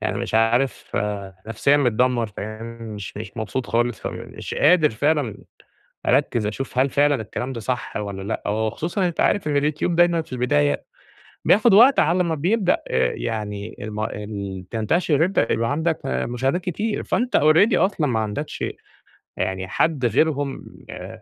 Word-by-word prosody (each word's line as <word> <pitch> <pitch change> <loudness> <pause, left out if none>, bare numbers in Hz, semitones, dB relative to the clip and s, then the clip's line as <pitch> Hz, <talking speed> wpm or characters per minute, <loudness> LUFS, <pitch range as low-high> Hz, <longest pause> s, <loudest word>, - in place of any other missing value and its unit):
يعني - - -2
مش - - -4
عارف 115 +2 +1 0.5
نفسيًا 140 +5 +2
متدمر 125 -2 +2
فاهم 110 +2 -7 0.3
مش 105 -2 -8
مش 105 -1 -7
مبسوط 110 +4 -3
خالص، 120 -1 -1
مش - - -6
قادر 155 0 +4
فعلًا 140 -1 0 0.7
أركز 125 -4 +2
أشوف 125 +4 -4
هل 135 +1 +3
فعلًا 145 +1 +3
الكلام 125 +4 -5
ده 115 - -5
صح 125 +2 -3
والّا 100 -2 -5 0.2
لأ، - - -3
وخصوصًا 135 - -1
أنت 170 - -6
عارف 200 - +2
إن 145 -1 +1
اليوتيوب 150 +4 0
دايمًا 175 -1 +4
في 130 - -11
البداية 75 - +1 0.6
بياخد 210 0 +5
وقت 250 +6 +7
على 175 +3 +3
ما 165 -1 0
بيبدأ 185 +5 +2
آآ 65 0 +1
يعني 105 - -4
الم 105 0 -5
ال 100 -3 -5
تنتشر 145 - +1
أنتَ 190 - +1
تبقى 115 +1 0
عندك 160 +2 0
مشاهدات 130 +6 -1
كتير 210 +5 -2
فأنت 245 +1 0
already 160 +9 +5
أصلًا 185 -6 +2
ما 115 -4 0
عندكش 110 +8 -3 0.7
يعني 95 0 -2
حد 145 +2 0
غيرهم 145 +1 0 0.2
آآ، - - -9
130 Hz, 155 wpm, -22 LUFS, 110-160 Hz, 0.7 s, وقت